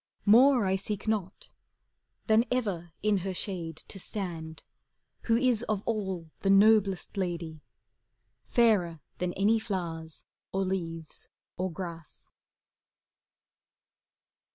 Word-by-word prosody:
More 245 +2 +6
I 190 0 +2
seek 205 +2 -4
not, 205 -4 -2 0.7
than 220 0 +5
ever 195 -9 -1
in 210 -1 +3
her 190 0 -3
shade 170 -5 -4
To 195 - -7
stand, 165 -6 -5 0.6
who 230 -1 +4
is 245 -3 +2
of 210 -2 0
all 190 -7 -2
the 195 - 0
noblest 200 -1 +4
lady. 170 -4 -3 0.8
Fairer 200 -9 +3 0.2
than 180 0 0
any 215 +4 +3
flowers, 170 -7 -4 0.3
or 195 0 0
leaves, 165 -4 -3 0.3
or 185 0 -2
grass. 165 -1 -7
190 Hz, 105 wpm, -29 LUFS, 170-215 Hz, 0.8 s, More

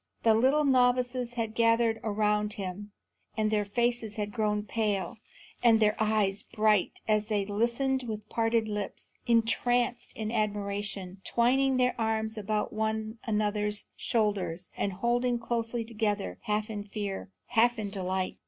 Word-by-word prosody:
The 225 - +6
little 265 +7 +3
novices 250 -2 +2
had 225 -2 -2
gathered 230 0 +3
around 210 -1 +1
him, 200 +1 -6 0.5
and 215 -1 +1
their 210 -1 +2
faces 235 +1 -1
had 210 -1 -3
grown 210 -2 0
pale 210 -1 -2 0.4
and 230 -2 +6
their 210 -1 +3
eyes 210 -2 +1
bright 215 -4 +1
as 215 -1 +2
they 205 -3 0
listened 235 +6 0
with 215 -1 -5
parted 225 0 +1
lips, 210 -2 -5
entranced 240 +1 +2
in 220 0 -3
admiration, 200 -3 -2
twining 260 +3 +2
their 250 0 +3
arms 220 0 0
about 215 0 -2
one 220 +1 -2
another's 210 -1 0
shoulders 200 -6 -1
and 200 - -1
holding 240 +4 +1
closely 230 0 -2
together, 215 -3 -2
half 210 +1 -1
in 205 -1 -4
fear, 200 -1 -5 0.2
half 240 0 +3
in 205 -2 -4
delight. 185 -1 -2
220 Hz, 140 wpm, -29 LUFS, 210-235 Hz, 0.5 s, The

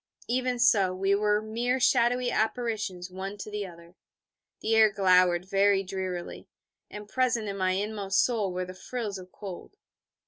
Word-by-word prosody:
Even 250 +1 0
so 200 -6 +3
we 195 +1 +1
were 210 +1 +2
mere 240 +4 -1
shadowy 245 0 +2
apparitions 215 -6 -2
one 195 +2 -6
to 210 +1 -8
the 210 -1 -3
other. 170 0 -14 0.7
The 225 +1 +1
air 220 -1 +6
glowered 185 -3 +3
very 195 0 +3
drearily, 185 -2 -5 0.4
and 210 0 -9
present 240 -2 0
in 200 - -3
my 185 -1 +1
inmost 200 0 0
soul 220 -6 -1
were 180 0 -3
the 185 - -9
frills 210 0 -5
of 185 0 -13
cold. 195 - -9
200 Hz, 160 wpm, -28 LUFS, 185-225 Hz, 0.7 s, air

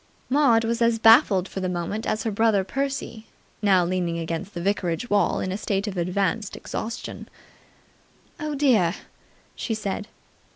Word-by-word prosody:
Maud 260 -5 +4
was 230 +1 -1
as 230 -1 +3
baffled 225 - +5
for - - -6
the 185 -1 -2
moment 180 +5 -3
as 215 - -1
her 225 - -1
brother 210 -1 +2
Percy, 270 -1 -4 0.3
now 190 -4 +4
leaning 175 -1 -1
against 170 +4 -4
the - - -3
vicarage 190 +2 -1
wall 205 0 +2
in 185 - -2
a 190 - -2
state 200 -1 -1
of 205 -3 -4
advanced 190 +4 -1
exhaustion. 230 +2 -6 1.1
"Oh, 305 -2 -3
dear!" 225 - +3 0.6
she 225 - -3
said. 210 0 -4
205 Hz, 155 wpm, -24 LUFS, 185-230 Hz, 1.1 s, baffled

